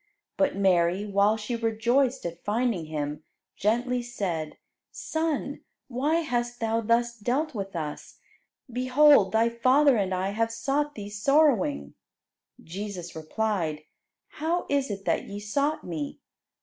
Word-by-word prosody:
But 285 -1 +1
Mary, 185 0 +2
while 200 +1 +3
she 220 +3 -3
rejoiced 235 +3 +1
at 170 0 -6
finding 220 -5 0
Him, 150 -1 -4 0.3
gently 245 +4 0
said, 185 -10 -4 0.3
"Son, 315 -3 -2 0.3
why 290 +7 +1
hast 240 -4 -2
Thou 225 0 0
thus 235 +1 +1
dealt 255 +8 -1
with 195 -4 -5
us? 150 -3 -5 0.5
Behold 255 -3 +5
Thy 225 +2 +3
father 255 +3 +4
and 195 -2 0
I 185 +1 -1
have 225 +2 0
sought 290 +5 -1
Thee 205 -1 -7
sorrowing." 210 - +2 0.7
Jesus 185 0 -6
replied, 160 -2 -2 0.5
"How 330 +3 -2
is 280 -2 +1
it 195 -1 -5
that - - 0
ye 200 +1 -7
sought 280 +9 -1
Me? 155 -5 -5
225 Hz, 130 wpm, -27 LUFS, 190-255 Hz, 0.7 s, Behold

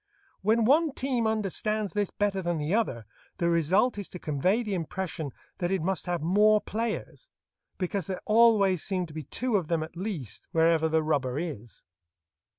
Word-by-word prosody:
When 220 +2 +3
one 300 +4 +4
team 255 -5 0
understands 215 -2 -1
this 205 -2 0
better 200 -2 -1
than 175 -2 -1
the 150 +4 -1
other, 135 - 0 0.3
the 170 -2 +1
result 190 +8 +2
is 200 - -6
to - - -7
convey 180 - 0
the 210 -3 -3
impression 170 -3 -3 0.3
that 175 - 0
it 190 -3 0
must 190 0 -1
have 175 -3 -1
more 210 +5 +5
players, 230 - -4 0.5
because 185 -1 -2
there 185 - -3
always 215 -5 +4
seem 185 -3 -1
to 160 - -13
be 155 - -4
two 245 - 0
of 175 -5 -3
them 165 -1 0
at 160 - -10
least 170 - -5
wherever 160 0 +3
the 160 0 +2
rubber 140 -4 0
is. 145 -9 -6
185 Hz, 175 wpm, -28 LUFS, 160-215 Hz, 0.5 s, more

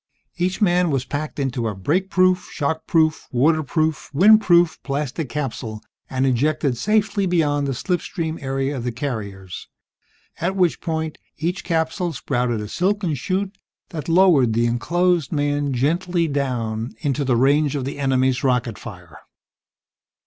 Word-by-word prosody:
Each 180 +1 -1
man 180 -2 +3
was 135 -3 -1
packed 150 +1 -4
into 130 -4 -1
a 105 - -3
break 170 - 0
proof, 185 -1 +2
shock 160 +1 -2
proof, 160 -2 +2
water 155 +6 +3
proof, 155 +1 -1
wind 215 +7 +7
proof 175 -4 +3
plastic 140 +1 -3
capsule, 120 -6 -4 0.3
and 130 0 0
ejected 140 +1 +1
safely 205 - +1
beyond 145 -5 +1
the 135 - -1
slipstream 165 0 -3
area 135 +1 -2
of 125 - -4
the 125 - -2
carriers, 105 -8 -5 0.7
at 185 +3 -1
which 180 -3 +1
point, 160 -1 -3 0.2
each 175 +4 -2
capsule 165 +1 -1
sprouted 125 -4 -1
a 105 - -5
silken 185 - 0
chute 190 +8 -2 0.3
that 160 -3 -6
lowered 165 -9 +5
the 115 +1 +2
enclosed 170 +7 +1
men 145 -1 0
gently 170 +6 0
down 120 -5 -2
into 145 -1 0
range 140 +4 +3
of 135 -3 -2
the 140 +1 -5
enemy's 130 -2 +1
rocket 125 -4 0
fire 90 -8 -11
145 Hz, 145 wpm, -22 LUFS, 130-175 Hz, 0.7 s, wind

